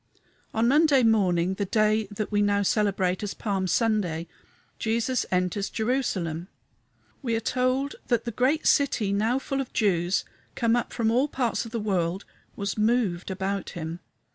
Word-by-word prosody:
On 225 +1 +1
Monday 285 -1 +5
morning, 190 -5 +3
the 200 +1 -2
day 215 +1 +2
that 210 0 -4
we 205 0 +2
now 205 0 +2
celebrate 195 -3 +1
as 205 -2 -4
Palm 195 -3 -1
Sunday, 180 -5 +1 0.5
Jesus 230 +3 0
enters 185 +2 0
Jerusalem. 190 -9 -1 0.7
We 235 -5 -1
are - - +1
told 255 +4 0
that 240 -2 +1
the 235 - -2
great 260 +8 +1
city, 240 -8 +2
now 220 +5 +1
full 270 0 -2
of 265 - -8
Jews 180 -3 +1 0.3
come 230 -1 +2
up 240 - -1
from 225 -1 0
all 255 +5 +3
parts 250 -4 -1
of 230 - -9
the 230 - -2
world, 190 -3 -1 0.3
was 200 +1 -3
moved 215 -6 +1
about 195 +1 -2
him. 165 +1 -5
215 Hz, 160 wpm, -26 LUFS, 190-240 Hz, 0.7 s, Monday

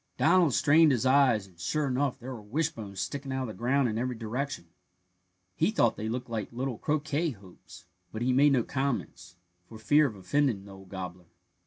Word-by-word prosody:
Donald 170 -8 +4
strained 155 +1 +5
his 125 -2 0
eyes, 130 -6 +4
and, 90 -3 -21
sure 150 - -1
enough, 135 0 0
there 130 0 -7
were 115 - -8
wishbones 110 - -3
sticking 140 -1 -4
out 130 0 -1
of - - -4
the - - -6
ground 130 +4 +1
in 110 -1 -2
every 125 0 -2
direction. 120 0 -4 0.9
He 165 - +2
thought 160 - +2
they 110 +1 -4
looked 125 +2 -4
like 115 -3 -4
little 125 -1 -4
croquet 155 +2 0
hoops, 95 -1 -15 0.3
but 110 +2 -4
he 130 +1 +2
made 140 +2 +5
no 125 -3 +3
comments, 135 -9 -3 0.3
for 110 - -10
fear 145 +8 +4
of 110 - -7
offending 100 +2 0
the 100 - -12
old 95 -1 -14
gobbler. 90 -2 -7
125 Hz, 195 wpm, -29 LUFS, 105-140 Hz, 0.9 s, strained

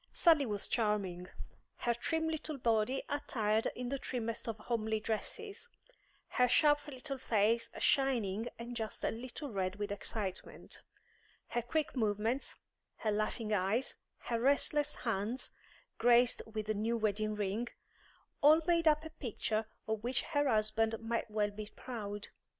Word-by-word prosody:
Sally 315 -6 +5
was 205 -2 0
charming. 200 -6 0 0.5
Her 240 - +1
trim 320 +7 0
little 315 -2 -3
body 230 +1 +1
attired 225 -7 +1
in 250 0 -3
the 275 +1 -2
trimmest 230 -3 -3
of 225 -1 -2
homely 220 -1 -1
dresses, 410 - -3 0.6
her 250 -1 +3
sharp 295 +3 +4
little 275 0 -6
face 230 -1 +2
shining 235 -6 +2
and 240 +1 -6
just 220 -2 -4
a - - +2
little 255 +4 -6
red 190 -2 -1
with 205 0 -3
excitement, 200 -2 -5 0.7
her 240 - 0
quick 290 +7 -1
movements, 220 +2 +1 0.4
her 215 - -1
laughing 215 +1 -1
eyes, 205 +6 +2 0.2
her 235 -1 -2
restless 290 +2 +3
hands 230 +2 -2 0.5
graced 245 0 +5
with 215 -1 -3
the 215 - 0
new 220 +3 0
wedding 215 -1 0
ring 210 +3 -1 0.7
all 305 +3 +8
made 335 -1 +3
up 305 0 +4
a 320 - -7
picture 220 -4 -2 0.2
of 220 -1 -1
which 250 +2 +1
her 290 -3 +1
husband 220 0 +2
might 230 0 -2
well 210 -1 +1
be 210 +1 -6
proud. 210 -5 -5
230 Hz, 145 wpm, -34 LUFS, 215-270 Hz, 0.7 s, all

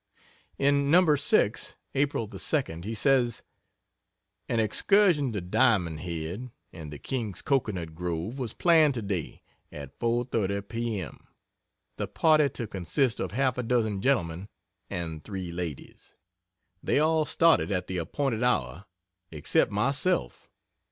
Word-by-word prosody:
In 140 0 +2
No. 165 -1 +5
6, 140 - +1 0.2
April 140 -4 0
the 100 -2 -10
2d, 90 - -1
he 110 +2 -3
says: 125 0 +2 1.1
"An 115 - +1
excursion 150 - +3
to 105 -4 -3
Diamond 90 -4 +2
Head, 85 +8 -5 0.2
and 80 -4 -9
the 75 - -7
king's 110 - -4
cocoanut 100 - -1
grove, 90 - -4
was 120 -4 -4
planned 160 -5 +4
to 115 - -3
day, 95 -6 -4 0.3
at 70 -1 -10
4.30 115 -4 -1
P. 115 -2 -2
M., 90 - -9 0.7
the - - -2
party 155 -3 +3
to 120 - -5
consist 105 - -1
of - - -3
half 130 0 +1
a - - +2
dozen 115 -5 0
gentlemen 95 -7 0 0.4
and 80 -3 -5
three 95 -4 -5
ladies. 85 -5 -7 0.7
They - - +1
all 155 +1 +3
started 165 -7 +3
at 90 -2 -1
the 95 -1 -3
appointed 120 - -2
hour 90 - 0 0.5
except 75 +5 +1
myself. 125 - 0
110 Hz, 135 wpm, -27 LUFS, 90-135 Hz, 1.1 s, No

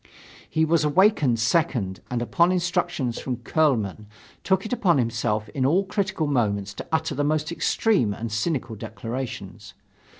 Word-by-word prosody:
He 160 0 +2
was 160 0 +2
an 150 -1 0
awkward 185 - +4
second 115 - 0
and 120 -1 -1
upon 170 +8 +3
instructions 175 -8 -1
from 130 - -3
Kuehlmann 115 - 0 0.4
took 190 +1 +1
it 215 - -3
upon 180 -10 +3
himself 115 -3 0
in 135 -4 -2
all 165 +9 +3
critical 190 -4 -1
moments 100 -8 0
to - - -8
utter 160 -1 0
the 145 +1 -1
most 155 +1 0
extreme 170 - +1
and 110 +2 -5
cynical 120 0 -2
declarations. 115 +4 -6
140 Hz, 155 wpm, -24 LUFS, 115-170 Hz, 0.4 s, awkward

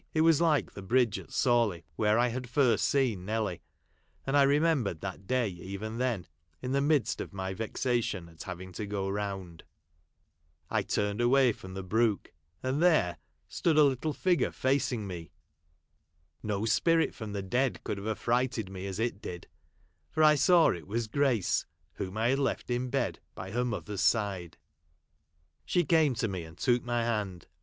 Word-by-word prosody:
It 155 - +4
Avas 165 -1 +5
ISke 160 -4 +2
the 100 - -9
bridge 115 +2 +2
at - - -13
Sawley, 115 -9 +2 0.2
\vhere 105 0 +3
I 120 +1 +3
had 125 +1 -5
first 125 -4 +3
seen 125 -10 +1
Nelly; 105 -3 -2 0.6
and 135 - 0
I 145 - +6
remembered 140 - +2
that 95 0 -6
day 130 -2 +1
even 100 +5 -6
then, 120 -9 -1 0.3
in 125 - -4
the 140 +1 +2
midst 145 -2 +1
of - - -7
my 95 0 -3
vexation 115 -3 -1
at 80 -1 -13
having 95 0 -7
to 105 +3 -5
go 100 -1 -2
round. 95 -4 -4 1.1
I - - +2
turned 105 +2 -1
away 125 +1 +5
from 95 -3 -10
the 95 - -4
brook, 110 +1 0 0.3
and 130 +4 0
there 120 - +3 0.3
stood 160 -3 +1
a 155 - +8
little 140 +2 +1
figure 175 -2 +1
facing 130 -4 0
me. 85 -4 -7 1.1
No 105 0 -2
spirit 165 +8 +2
from 110 -4 -7
the 100 -1 -3
dead 125 +6 0
could 100 - -3
have 100 - -6
affrighted 115 -1 0
me 95 0 -6
as 95 -1 -4
it 115 -3 -1
did; 90 -1 -7 0.6
for 155 - +1
I 155 0 +8
saw 165 +4 +5
it 85 -1 -6
was 115 +3 -1
Grace, 120 -4 +1 0.3
whom 95 +2 -5
I 115 +2 +2
had 135 +2 +2
left 135 -2 -1
in 125 +1 -1
bed - - -1 0.2
by 95 +1 -7
her 120 +3 0
mother's 105 -4 -3
side. 95 -7 0
I - - -45 1.0
She 175 -2 +1
came 155 -4 +3
to 115 0 0
me, 95 -4 -4
and 80 +1 -12
took 120 +7 +2
my 120 -1 0
hand. 105 -7 -2
115 Hz, 180 wpm, -30 LUFS, 95-130 Hz, 1.1 s, a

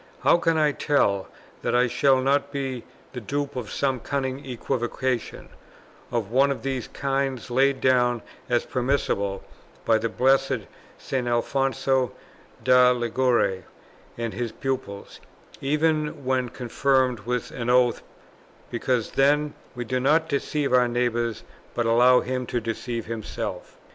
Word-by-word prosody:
How - - +5
can 165 -1 +1
I 150 -1 +3
tell, 100 -10 +1 0.3
that - - 0
I 125 +1 +5
shall 130 +2 +3
not 140 +2 +1
be 135 -4 -4 0.3
the 125 - -5
dupe 140 +6 -3
of 120 -5 -4
some 135 -2 0
cunning 135 +1 -3
equivocation, 125 0 -3 0.6
of 115 -4 -2
one 135 +3 +4
of 140 - -3
the 135 -2 -1
three - - -12
kinds 135 -3 -2
laid 135 +2 +3
down 125 -3 +2 0.3
as 120 -1 +1
permissible 120 -7 -1 0.4
by 110 -1 +4
the 115 +1 -1
blessed 135 +1 +2 0.4
St. 130 -2 -3
Alfonso 130 +1 +1 0.5
da 125 0 +6
Liguori 120 -5 +1 0.5
and 115 -1 -3
his 120 -2 -3
pupils, 125 -8 -5 0.4
even 150 0 0
when 130 -1 0
confirmed 130 0 +1
with 120 +3 -3
an 120 -1 -4
oath, 125 -1 +3 0.7
because 120 -1 -1
'then 145 +2 +2 0.2
we 120 0 -4
do 130 +3 -1
not 155 +5 +3
deceive 140 -1 -1
our 125 -1 +5
neighbour, 120 -1 0 0.4
but 120 - 0
allow 125 +2 +5
him 125 -1 -3
to 120 - -1
deceive 115 0 -4
himself?' 110 -1 -5
125 Hz, 140 wpm, -25 LUFS, 120-135 Hz, 0.7 s, da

